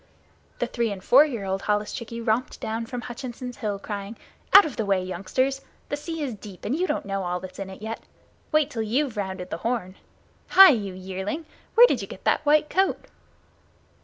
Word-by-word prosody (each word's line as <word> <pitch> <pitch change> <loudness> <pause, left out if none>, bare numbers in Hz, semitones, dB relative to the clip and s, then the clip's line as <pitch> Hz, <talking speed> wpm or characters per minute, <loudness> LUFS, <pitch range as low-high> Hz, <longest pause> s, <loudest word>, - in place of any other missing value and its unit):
The - - 0
three 235 -3 -1
and 190 -2 -6
four 275 +8 +7
year 235 -8 -4
old 190 0 -2
holluschickie 220 +3 -2
romped 235 +3 0
down 225 +1 -3
from 245 -1 -5
Hutchinson's 245 0 -7
Hill 205 -2 -2
crying: 200 +1 -6 0.3
"Out 395 - +10
of 295 - -5
the 225 - -1
way, 195 -2 +1
youngsters! 255 +10 -1 0.3
The - - 0
sea 320 +1 -5
is 265 -4 -3
deep 200 -3 -11
and 250 - 0
you 365 +3 0
don't - - -2
know 195 0 -2
all 180 -1 -2
that's 185 +1 -10
in 195 -1 -5
it 190 +2 -11
yet. 225 +1 -5 0.5
Wait 305 -2 +2
till 230 - -3
you've 245 +4 0
rounded 190 -3 -4
the - - -2
Horn. 220 -2 -2 0.6
Hi, 385 -1 +12
you 200 -7 -2
yearling, 190 - -5 0.3
where 475 +2 +10
did - - +1
you - - -6
get - - -11
that - - +2
white 300 +1 +5
coat?" 385 +4 0
225 Hz, 200 wpm, -25 LUFS, 195-270 Hz, 0.6 s, Hi